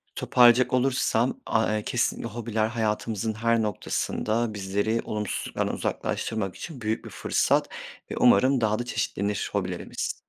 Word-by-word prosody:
Toparlayacak 125 +1 +5
olursam, 130 - +1
aaa, 110 -1 +1
eee, 105 - -4
kesinlikle 120 -1 -1
hobiler 110 -1 -1
hayatımızın 110 -1 -1
her 115 +1 +1
noktasında 110 +1 -1
bizleri 100 +3 -1
olumsuzluklardan 105 -2 -3
uzaklaştırmak 105 -4 -2
için 145 -8 -8
büyük 110 +1 -2
bir - - -7
fırsat - - +1 0.4
ve - - -3
umarım 130 +5 +5
daha 110 0 +1
da 120 - -3
çeşitlenir 105 -3 -2
hobilerimiz. - - -3
110 Hz, 130 wpm, -26 LUFS, 105-120 Hz, 0.4 s, Toparlayacak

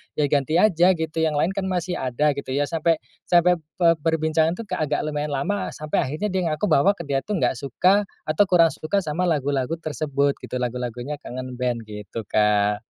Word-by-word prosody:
"Ya 145 -2 0
ganti 145 +2 +1
aja, 180 -1 +4
gitu, 160 0 -3
yang 160 -2 +1
lain 165 +6 +1
kan 195 -1 -3
masih 180 -1 -2
ada," 130 +4 +1
gitu. 140 -1 -4
Ya 145 - +2
sampai 165 +1 0 0.2
sampai 175 0 +4 0.2
pe 170 -3 +3
perbincangan 160 +1 +1
tuh 230 - -6
kayak 185 -7 -2
agak 145 - 0
lumayan 150 -1 -2
lama, 195 +8 -1
sampai 155 0 -1
akhirnya 170 +9 -3
dia 185 -2 0
ngaku 155 +6 -1
bahwa 195 +9 +4
dia 140 -2 0
tuh 210 +8 -4
nggak 130 -7 0
suka 185 +9 +2 0.2
atau 155 +6 +3
kurang 170 -3 +5
suka 195 +5 -2
sama 170 +3 -1
lagu-lagu 140 -2 0
tersebut, 145 -3 -1
gitu, - - -7
lagu-lagunya 125 +3 -3
Kangen 130 -1 -7
Band, 120 -2 -1
gitu, 105 +1 -7
Kak. 105 0 +2
155 Hz, 190 wpm, -23 LUFS, 135-175 Hz, 0.2 s, kurang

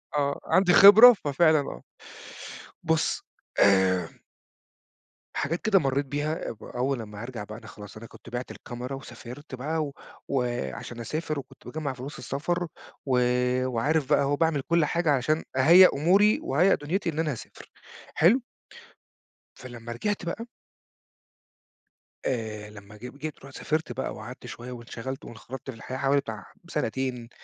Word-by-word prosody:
آه، 140 -1 0
عندي 185 -1 +4
خبرة، 215 +7 +10
ففعلًا 155 - +3
آه. 140 - -5 1.0
بُص، 160 -1 0 0.4
آآ 95 -3 +4 1.3
حاجات 165 +4 -1
كده 215 -3 +4
مرّيت 140 -1 0
بيها 145 +3 -3
أب 110 - -10
أول 130 0 -2
أمّا 105 -1 -9
هارجع 120 -3 -6
بقى 105 +1 -9
أنا 110 - -13
خلاص، 105 0 -11
أنا 110 - -10
كنت 115 - -14
بعِْت 120 +1 -5
الكاميرا 125 +3 -7
وسافرت 130 +1 -10
بقى 155 +5 -2
و 145 - -6 0.4
وعشان 120 - -3
أسافر 155 +5 -3
وكنت 135 0 -14
باجمّع 150 -3 -3
فلوس 135 +3 -8
السفر 175 +7 -2 0.4
و 130 -3 +2 0.5
وعارف 135 +4 0
بقى - - +4
أهو 140 0 0
وباعمل 160 -1 +1
كل 165 +3 +2
حاجة 170 +1 +1
عشان 145 +4 +1
أهيّأ 170 +8 +8
أموري 190 +9 +4
وأهيّأ 175 +8 +3
دنُيتي 170 +6 -2
إن 155 -1 -4
أنا 160 -2 +1
هاسافر، 120 - -10 0.4
حلو؟ 200 +12 +5 1.1
فلمّا 120 -2 -9
رجعت 200 - -2
بقى 205 +7 -4 1.8
آآ 110 -4 -3
لمّا 105 0 -13
جب 125 +5 -10
جيت 155 0 -6
رُحت 135 - -12
سافرت 155 +1 -2
بقى 130 - -3
وقعدت 120 +4 -10
شوية 120 +1 -8
وانشغلت 125 +2 -7
وانخرطت 130 +4 -9
في 130 - -5
الحياة 130 +3 -6
حوالي 140 +1 +2
بتاع 110 -6 -7 0.2
سنتين، 125 0 -3
135 Hz, 145 wpm, -27 LUFS, 120-155 Hz, 1.8 s, خبرة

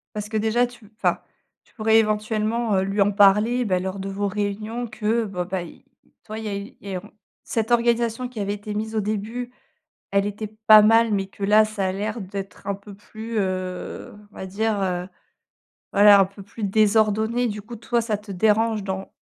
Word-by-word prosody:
Parce 210 0 -4
que 220 - -1
déjà 225 +3 +2
tu, 240 -4 -13
enfin, - - 0 0.5
tu - - -29
pourrais 220 -1 +4
éventuellement, 215 +1 0
heu, 190 - +2
lui 195 +1 0
en 200 +1 +4
parler, 210 +5 +4
bah 185 -3 +1
lors 190 +1 -4
de 195 - -4
vos 200 +1 -2
réunions 215 +4 -3
que 220 +1 -1
bon, 180 -3 -3
bah 185 0 -3
il 175 - -13 0.2
il - - -31
tu - - -31
vois, 215 +1 -5
il 220 - -7
y - - -2
a 200 - -2
eu 200 +1 -7
et 195 -2 -5
on 200 +4 -11 0.3
cette 225 0 -2
organisation 235 +1 +1
qui 245 -3 -8
avait 200 0 -1
été 210 +1 -6
mise 220 +1 -3
au 215 - +1
début, 220 +4 -3 0.6
elle 200 0 +2
était 210 +1 -4 0.2
pas 215 -1 +10
mal 225 +1 +5
mais 195 -1 -1
que 200 - -7
là, 210 +2 +6
ça 215 -3 -2
a 185 - -1
l'air 210 +4 -3
d'être 195 0 -7
un 200 - 0
peu 200 +1 -12
plus, 220 +2 -6
heu, 185 -2 -3 0.2
on - - -22
va 190 - -6
dire, 210 +1 -1
heu, 180 -1 -1 0.9
voilà, 205 0 +7
un 195 - +6
peu 195 +1 -13
plus 215 +2 -10
désordonné, 220 +3 +2
du 210 -1 -4
coup, 230 +4 -10
toi, 235 +2 0
ça 225 -2 -1
te 205 0 -13
dérange 215 +2 +2
dans 190 0 -5
210 Hz, 215 wpm, -23 LUFS, 200-220 Hz, 0.9 s, pas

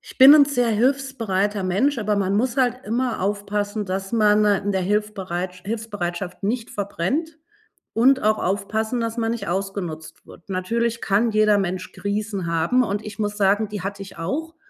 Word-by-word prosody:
Ich - - -14
bin 270 +3 +10
'n 295 - +8
sehr 245 -4 0
hilfsbereiter 220 -5 0
Mensch, 230 +9 +1
aber 210 -1 0
man 195 0 0
muss 245 +5 0
halt 250 -1 +1
immer 240 +2 -1
aufpassen, 205 +1 -2
dass 195 +1 -4
man 210 -1 +4
in 205 -1 +1
der 190 - 0
Hilfbereitsch 185 -3 -2
Hilfsbereitschaft 200 -5 -4
nicht 225 +3 -2
verbrennt, 235 - -2 0.6
und 260 +3 +4
auch 215 0 +2
aufpassen, 220 +5 -1
dass 230 0 -3
man 225 -1 0
nicht 235 - -5
ausgenutzt 180 -4 -4
wird. 170 - -16
Natürlich 230 +5 -1
kann 220 +3 +2
jeder 215 -1 +3
Mensch 185 -1 -3
Krisen 200 -3 -3
haben 170 +10 +2
und 210 0 -3
ich 210 0 -8
muss 210 0 -2
sagen, 205 +2 +2
die 210 -3 -5
hatte 200 0 -5
ich 195 - -10
auch, 315 - -4
210 Hz, 170 wpm, -22 LUFS, 195-230 Hz, 0.6 s, bin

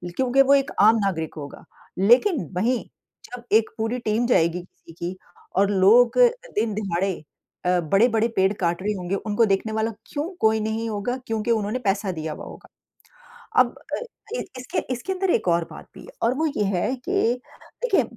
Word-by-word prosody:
क्योंकि 265 +1 +3
वो 275 +1 +5
एक 275 -1 +2
आम 215 +2 +7
नागरिक 165 -5 -2
होगा। 145 -2 -8 0.4
लेकिन 255 - +4
वहीं 235 +6 +1 0.4
जब 245 -1 -9
एक 220 0 +4
पूरी 225 +3 -1
टीम 220 +3 +1
जाएगी 170 -6 +2
किसी 175 -1 -18
की 175 +2 -5 0.4
और 200 +1 +3
लोग 210 +5 +5 0.4
दिन-दहाड़े 195 -5 -1 0.4
अ, 180 0 +3
बड़े-बड़े 220 +7 +3
पेड़ 190 0 +3
काट 170 0 0
रहे 210 +2 -1
होंगे, 185 -1 -3
उनको 210 +3 +1
देखने 200 +1 0
वाला 220 +1 0 0.2
क्यों 290 - -2 0.2
कोई 220 0 +3
नहीं 220 +1 -2
होगा 215 +4 -2
क्योंकि 225 +1 -1
उन्होंने 220 +2 0
पैसा 200 -3 0
दिया 160 -2 -4
हुआ - - -9
होगा। - - -12 0.9
अब - - +6 0.3
अ - - +1
अ, 485 -1 -7 0.2
इसके 255 - -4
इसके 255 +10 -3
अंदर 380 0 -1
एक 225 - +1
और 170 0 +2
बात - - -11
भी - - -11
है - - -14
और 235 +2 +2
वो 320 +3 +1
ये 210 - +1
है 185 +8 0
कि - - -3 0.7
देखिए 395 - +3
215 Hz, 180 wpm, -23 LUFS, 190-245 Hz, 0.9 s, आम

